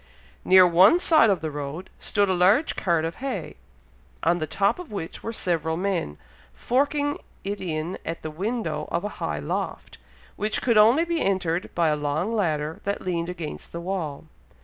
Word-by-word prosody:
Near 185 0 +7
one 180 - +6
side 315 -10 +5
of 195 - +1
the 160 -1 -3
road 145 +5 -6
stood 205 -2 +1
a 190 - +2
large 190 - +3
cart 170 -4 +1
of 165 - -4
hay, 270 +1 -4 0.7
on 170 +2 +2
the 155 - -2
top 200 - +1
of 360 -8 -9
which 180 -6 -6
were 225 - -4
several 165 -6 -1
men, 180 - -2 0.4
forking 290 +3 0 0.2
it 200 +1 -4
in 165 0 -3
at 165 +1 -5
the 155 - -4
window 220 +8 -3
of 170 - -1
a 210 - -2
high - - -1
loft, - - -4 0.4
which 215 +1 0
could 230 -4 +3
only 240 +10 +5
be 340 -1 -1
entered 180 -3 0
by 170 -2 +3
a 150 - +2
long 150 +8 -1
ladder 155 -6 -1
that 200 0 -2
leaned 170 -2 -2
against 170 -4 -6
the 170 - -4
wall. 170 -6 -4
180 Hz, 180 wpm, -25 LUFS, 165-210 Hz, 0.7 s, Near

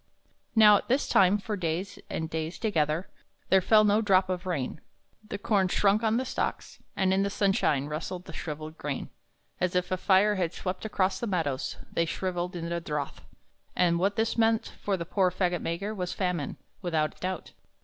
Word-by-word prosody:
Now 210 -2 +8
at - - -6
this 260 +4 +1
time, 195 +1 +5
for 210 +1 -4
days 175 +1 -3
and 160 - -3
days 160 +1 -4
together, 165 -5 0 0.4
There 190 0 +5
fell 215 +3 +5
no 210 +1 +4
drop 190 -3 +3
of 185 0 -3
rain; 150 -4 -3 0.5
The - - -3
corn 200 -2 +2
shrunk 200 +3 +3
on 225 0 +2
the 260 - -1
stalks; - - -3 0.2
and 190 -1 +2
in 190 - +2
the 200 - +1
sunshine 195 - +1
Rustled 165 +4 -5
the 165 - -10
shriveled 155 0 -6
grain; 145 -2 -4 0.5
As 180 0 0
if 180 0 0
a 185 - +1
fire 200 +2 +4
had 175 -2 -1
swept 185 +3 -4
across 190 -3 0
the 235 - -2
meadows 160 -9 -1 0.2
They 170 - +2
shriveled 180 +1 -3
in 170 -1 -4
the 170 0 -2
drouth; 150 -3 -4 0.5
And 170 -2 +3
what 195 +3 +1
this 225 +1 0
meant 225 0 +2
for 200 -2 0
the 170 - -4
poor 185 +1 +2
fagot 180 -1 0
maker 190 +6 -3
Was 180 -3 -3
famine, 180 -6 -2 0.2
without 160 -4 -1
doubt. 185 -1 -4
185 Hz, 190 wpm, -28 LUFS, 170-200 Hz, 0.5 s, Now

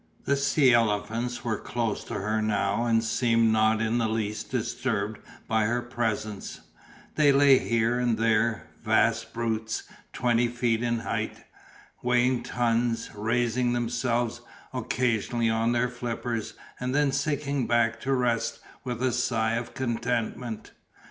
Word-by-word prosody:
The 140 - +2
sea 140 -1 +3
elephants 115 +2 0
were 110 -4 -1
close 115 -3 -2
to - - -6
her 110 +2 -1
now 105 +1 0
and 115 -1 +3
seemed 115 0 +2
not 110 0 +3
in 115 +2 +1
the 115 - +1
least 110 -1 -3
disturbed 110 -3 -2 0.3
by 110 -1 +2
her 120 +2 0
presence, 110 -4 -3 0.6
they 150 -2 +6
lay 140 -1 +6
here 115 +1 +1
and 120 -2 +1
there, 110 0 +1 0.2
vast 115 +1 +2
brutes, 115 -1 -2 0.3
twenty 120 -1 +2
feet 120 -1 0
in 120 -1 0
height, - - -3 0.6
weighing 125 0 +2
tons, 115 -1 0
raising 120 +3 0
themselves 120 0 -1 0.3
occasionally 120 -2 0
on 115 +1 +1
their 120 +1 +2
flippers 120 -2 -4 0.2
and 125 +1 -2
then 145 -1 +3
sinking 140 -3 -1
back 115 -1 +2
to 135 - -2
rest 125 -3 0 0.2
with 125 0 -4
a 130 - +2
sigh 115 -2 0
of 120 +1 -4
contentment. 120 -2 -2
115 Hz, 135 wpm, -27 LUFS, 110-125 Hz, 0.6 s, they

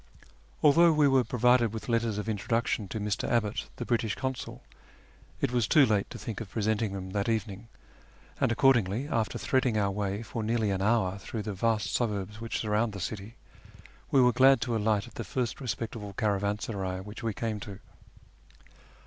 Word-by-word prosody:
Although 165 +3 +6
we 150 -1 +4
were 135 -2 +4
provided 125 -2 +3
with 110 - -6
letters 115 -3 0
of 105 - -4
introduction 110 0 -1
to 110 - -5
Mr. 105 -1 -2
Abbott, 115 0 0
the - - -5
British 115 -3 0
Consul, 130 -1 -5 0.8
it - - +1
was 120 -3 +1
too 150 -4 +6
late 105 -4 0
to - - -8
think 115 -2 -6
of 110 - -7
presenting 110 -1 -1
them 95 -1 -6
that 100 +2 -1
evening, 110 -1 -2 0.7
and - - +2
accordingly, 120 -1 +3
after 115 -7 -1
threading 130 -4 +1
our 100 -2 +1
way 100 +1 -2
for 115 +1 -5
nearly 110 -1 0
an 95 -1 -1
hour 100 -3 +1
through 110 +2 -5
the 105 0 -4
vast 110 +2 0
suburbs 105 -2 -2
which 115 -1 -3
surround 110 0 0
the 100 - -6
city, 105 +4 -5 0.7
we 135 - +4
were 125 -1 +5
glad 135 +2 +6
to 120 -4 -1
alight 105 -2 +1
at - - -14
the - - -5
first 125 -1 -3
respectable 115 -4 -4
caravansaray 100 -2 -1
which 105 +2 -9
we 115 - -1
came 110 -2 -2
to. 100 -3 -8
110 Hz, 180 wpm, -29 LUFS, 100-120 Hz, 0.8 s, Although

